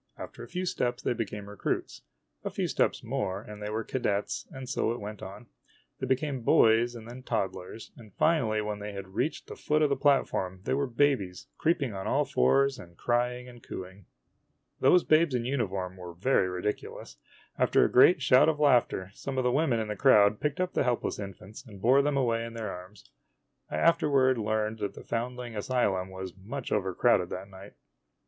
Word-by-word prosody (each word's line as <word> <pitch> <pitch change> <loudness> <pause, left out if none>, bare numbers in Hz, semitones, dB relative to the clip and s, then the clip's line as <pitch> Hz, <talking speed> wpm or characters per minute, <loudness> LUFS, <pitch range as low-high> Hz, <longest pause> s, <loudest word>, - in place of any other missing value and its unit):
After - - -9
a 120 - -8
few 180 +5 -3
steps 125 -8 -2
they - - +1
became 105 -3 -5
recruits. 105 -1 -3 0.4
A - - -2
few - - -2
steps - - 0
more, 95 -1 -2
and 105 0 -11
they 105 - -4
were 110 +1 -2
cadets, 105 -4 -2
and 130 -1 -8
so 120 - 0
it 120 - -4
went 105 0 -7
on. 100 +6 -9 0.5
They 130 - -3
became 135 0 -1
boys 115 +1 +4
and 115 -1 -10
then 125 +2 -9
toddlers; 110 -3 -4
and 110 -3 -14
finally, 115 -10 +2
when 105 -1 -4
they 105 -1 -6
reached 95 +11 -3
the - - -9
foot 155 +1 +1
of 150 - +3
the - - +3
platform, 115 -10 +1
they - - -1
were 140 +1 0
babies, 120 -8 0
creeping 150 -8 +1
on 95 -1 -5
all - - +2
fours 135 - +2
and 85 -1 -13
crying 125 +1 -1
and 120 -1 -13
cooing. 95 -1 -9 0.7
Those 180 - +5
babes 155 -3 +3
in 120 -1 -1
uniform 95 -8 -2
were 90 -2 -9
very 95 -1 +2
ridiculous. 90 +3 -5 0.4
After - - +4
a - - -1
great 140 +3 +6
shout 130 +4 +6
of 155 -2 -1
laughter, 120 -9 +2
some 135 +5 -6
of 130 - +1
the 125 - +2
women 135 -4 +2
in 110 - -2
the 105 - -2
crowd 105 +1 +5
picked 150 +2 -2
up 185 0 -1
the - - +1
helpless 125 -4 -1
infants 100 +3 -9
and 105 -7 -13
bore 130 +7 +5
them 145 0 0
away 115 -3 +1
in 115 0 -7
their 110 -3 -4
arms. 90 +3 -12 0.6
I - - -4
afterward 135 -6 +3
learned 110 0 -1
that 100 -1 -3
the - - -10
foundling 120 0 -4
asylum 100 -4 0
was 95 -1 -7
much 120 +8 -7
overcrowded 95 -1 +2
that 95 +2 -6
night. 95 +1 -12
115 Hz, 195 wpm, -29 LUFS, 100-130 Hz, 0.7 s, great